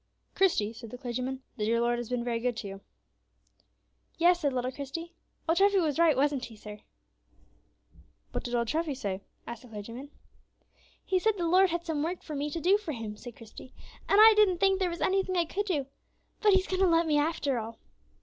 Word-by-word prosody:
"Christie," 230 Hz, -, +2 dB
said 230 Hz, 0 st, -10 dB
the 250 Hz, -, -8 dB
clergyman, 255 Hz, +1 st, -4 dB
"the 210 Hz, -, -1 dB
dear 230 Hz, +2 st, +2 dB
Lord 240 Hz, 0 st, +1 dB
has 240 Hz, -, -6 dB
been 250 Hz, -1 st, -1 dB
very 235 Hz, -1 st, -1 dB
good 240 Hz, -1 st, -1 dB
to 210 Hz, -, -5 dB
you." 195 Hz, 0 st, -8 dB, 1.4 s
"Yes," 345 Hz, +1 st, +4 dB
said 290 Hz, -4 st, 0 dB
little 255 Hz, 0 st, -2 dB
Christie, 285 Hz, +6 st, -7 dB, 0.3 s
"old 330 Hz, +2 st, +2 dB
Treffy 400 Hz, 0 st, +4 dB
was 315 Hz, -3 st, 0 dB
right; 325 Hz, -5 st, +4 dB
wasn't 280 Hz, -1 st, +1 dB
he, 225 Hz, -, -12 dB
sir?" 210 Hz, 0 st, -10 dB, 1.5 s
"What -, -, -4 dB
did 245 Hz, 0 st, -3 dB
old 235 Hz, -1 st, 0 dB
Treffy 310 Hz, +1 st, -1 dB
say?" 200 Hz, -6 st, -4 dB, 0.2 s
asked 235 Hz, -1 st, -7 dB
the 250 Hz, -, -14 dB
clergyman. 230 Hz, +5 st, -8 dB, 1.0 s
"He 375 Hz, -, +1 dB
said 435 Hz, +2 st, +1 dB
the 345 Hz, -, -1 dB
Lord 370 Hz, +3 st, +5 dB
had 345 Hz, 0 st, -3 dB
some 315 Hz, -3 st, -2 dB
work 340 Hz, +4 st, -3 dB
for 310 Hz, -, -7 dB
me 290 Hz, +1 st, -2 dB
to 330 Hz, -, -4 dB
do 380 Hz, +5 st, +3 dB
for 335 Hz, -8 st, -5 dB
Him," 225 Hz, -4 st, -6 dB
said 240 Hz, +2 st, -10 dB
Christie, 230 Hz, +3 st, -13 dB, 0.3 s
"and 400 Hz, -, +5 dB
I 440 Hz, +1 st, +10 dB
didn't 410 Hz, -4 st, +4 dB
think 390 Hz, +1 st, +3 dB
there 370 Hz, -2 st, +1 dB
was 340 Hz, 0 st, -6 dB
any 385 Hz, +1 st, +2 dB
thing 370 Hz, -1 st, -3 dB
I 340 Hz, -, +3 dB
could 410 Hz, +5 st, -3 dB
do; 300 Hz, -8 st, 0 dB, 0.6 s
but 420 Hz, -2 st, +5 dB
He's 380 Hz, 0 st, +3 dB
going 375 Hz, 0 st, -2 dB
to 380 Hz, -, +5 dB
let 335 Hz, 0 st, +3 dB
me, 300 Hz, -2 st, +2 dB
after 290 Hz, -4 st, 0 dB
all." 225 Hz, 0 st, -7 dB
290 Hz, 215 wpm, -29 LUFS, 240-355 Hz, 1.5 s, I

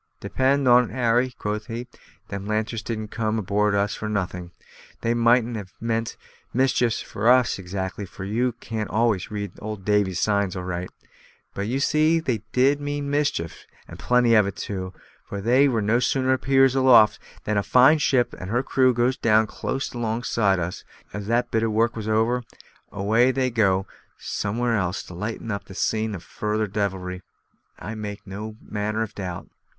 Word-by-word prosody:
"Depend 135 Hz, +1 st, +1 dB
on't, 125 Hz, 0 st, +6 dB
Harry," 125 Hz, 0 st, +1 dB
quoth 105 Hz, +2 st, -3 dB
he, 120 Hz, +1 st, -5 dB, 0.4 s
"them 100 Hz, 0 st, -5 dB
lanterns 110 Hz, +1 st, -1 dB
didn't 110 Hz, -1 st, -4 dB
come 110 Hz, 0 st, -1 dB
aboard 105 Hz, 0 st, +1 dB
of 100 Hz, -, +3 dB
us 100 Hz, +1 st, -1 dB
for 110 Hz, -, -5 dB
nothing. 90 Hz, -4 st, -3 dB, 0.5 s
They 115 Hz, -, +1 dB
mightn't 120 Hz, 0 st, +3 dB
have 100 Hz, -2 st, -8 dB
meant 115 Hz, 0 st, -2 dB, 0.3 s
mischief 125 Hz, -2 st, +2 dB
for 110 Hz, +4 st, 0 dB
us 125 Hz, -5 st, +4 dB
exactly 95 Hz, +2 st, -5 dB
for 95 Hz, -, -9 dB
you 120 Hz, +5 st, 0 dB
can't 110 Hz, -2 st, -5 dB
always 110 Hz, -4 st, +1 dB
read 100 Hz, -2 st, -4 dB
Old 105 Hz, -3 st, -6 dB
Davy's 105 Hz, -3 st, +1 dB
signs 100 Hz, -3 st, +1 dB
aright; 90 Hz, -1 st, -4 dB, 0.6 s
but 100 Hz, +1 st, -3 dB
you 130 Hz, +4 st, -1 dB
see 155 Hz, +3 st, +3 dB
they 125 Hz, -10 st, -2 dB
did 140 Hz, +3 st, +3 dB
mean 145 Hz, 0 st, -3 dB
mischief, 145 Hz, -, -1 dB, 0.2 s
and -, -, -11 dB
plenty 125 Hz, -1 st, +3 dB
of 105 Hz, -3 st, +5 dB
it 100 Hz, -, -5 dB
too, 95 Hz, -2 st, -5 dB, 0.4 s
for 100 Hz, -, -4 dB
they 125 Hz, +7 st, +4 dB
no 115 Hz, -2 st, +1 dB
sooner 130 Hz, +1 st, +1 dB
appears 135 Hz, 0 st, +3 dB
aloft 130 Hz, -5 st, +6 dB, 0.2 s
than 105 Hz, -1 st, -1 dB
a -, -, +3 dB
fine 130 Hz, +9 st, +5 dB
ship 130 Hz, -4 st, +2 dB
and 90 Hz, -, -6 dB
her 120 Hz, +4 st, +1 dB
crew 130 Hz, -2 st, +3 dB
goes 120 Hz, +2 st, +2 dB
down 110 Hz, -1 st, +3 dB
close 135 Hz, +4 st, -4 dB
alongside 115 Hz, -4 st, 0 dB
of 85 Hz, -, 0 dB
us; 90 Hz, -, -7 dB
and -, -, -25 dB
as -, -, -29 dB
soon 105 Hz, -, -4 dB
as 100 Hz, -, -9 dB
that 120 Hz, +1 st, +1 dB
bit 110 Hz, -, +1 dB
of 115 Hz, -1 st, 0 dB
work 115 Hz, +2 st, +2 dB
was 110 Hz, -2 st, -5 dB
over, 115 Hz, +3 st, +2 dB, 0.5 s
away 110 Hz, +6 st, +2 dB
they 130 Hz, -1 st, 0 dB
go 95 Hz, -4 st, +2 dB, 0.3 s
somewhere 115 Hz, +3 st, -1 dB
else 95 Hz, -3 st, -1 dB
to -, -, -11 dB
light 105 Hz, +6 st, -4 dB
up 100 Hz, -, -4 dB
the 95 Hz, -, -12 dB
scene 110 Hz, +1 st, -1 dB
of 90 Hz, -, -9 dB
further 105 Hz, 0 st, -2 dB
devilry, 95 Hz, -3 st, -3 dB, 0.6 s
I 105 Hz, +6 st, -6 dB
make 105 Hz, -2 st, -6 dB
no 105 Hz, +3 st, -7 dB
manner 105 Hz, +1 st, -2 dB
of 110 Hz, -1 st, -7 dB
doubt." 90 Hz, -4 st, -6 dB
110 Hz, 185 wpm, -24 LUFS, 100-125 Hz, 0.6 s, on't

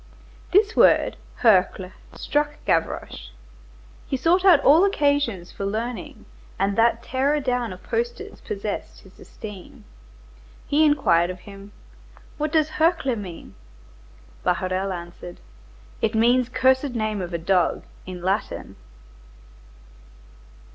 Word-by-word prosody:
This 415 Hz, +3 st, +3 dB
word, -, -, +4 dB, 0.3 s
Hercle, 190 Hz, -4 st, +3 dB, 0.2 s
struck 295 Hz, 0 st, -1 dB
Gavroche. 160 Hz, -, -2 dB, 0.8 s
He 270 Hz, -, -1 dB
sought 340 Hz, +7 st, +2 dB
all 325 Hz, -2 st, +6 dB
occasions 285 Hz, -, 0 dB
for -, -, -7 dB
learning, 220 Hz, +4 st, -4 dB, 0.3 s
and 195 Hz, +1 st, 0 dB
that 230 Hz, +1 st, +2 dB
tearer 275 Hz, +4 st, 0 dB
down 250 Hz, -4 st, -1 dB
of 185 Hz, -, -11 dB
posters 475 Hz, +1 st, -4 dB
possessed 425 Hz, -, -5 dB
his -, -, -19 dB
esteem. 210 Hz, +2 st, -11 dB, 0.8 s
He 295 Hz, +2 st, +2 dB
inquired 185 Hz, -, +3 dB
of 185 Hz, 0 st, -7 dB
him:— 200 Hz, 0 st, -12 dB, 0.7 s
"What 305 Hz, 0 st, -1 dB
does 310 Hz, -1 st, +2 dB
Hercle 320 Hz, -6 st, +2 dB
mean?" 180 Hz, -, -9 dB, 0.9 s
Bahorel 185 Hz, +2 st, -1 dB
answered:— 175 Hz, 0 st, -8 dB, 0.6 s
"It 225 Hz, 0 st, 0 dB
means 240 Hz, +2 st, +3 dB
cursed 260 Hz, +1 st, +2 dB
name 215 Hz, -3 st, -1 dB
of 175 Hz, -1 st, -5 dB
a 170 Hz, -, -1 dB
dog, 175 Hz, +1 st, +1 dB, 0.2 s
in 180 Hz, -1 st, -7 dB
Latin." 195 Hz, +3 st, -3 dB
230 Hz, 115 wpm, -23 LUFS, 185-290 Hz, 0.9 s, all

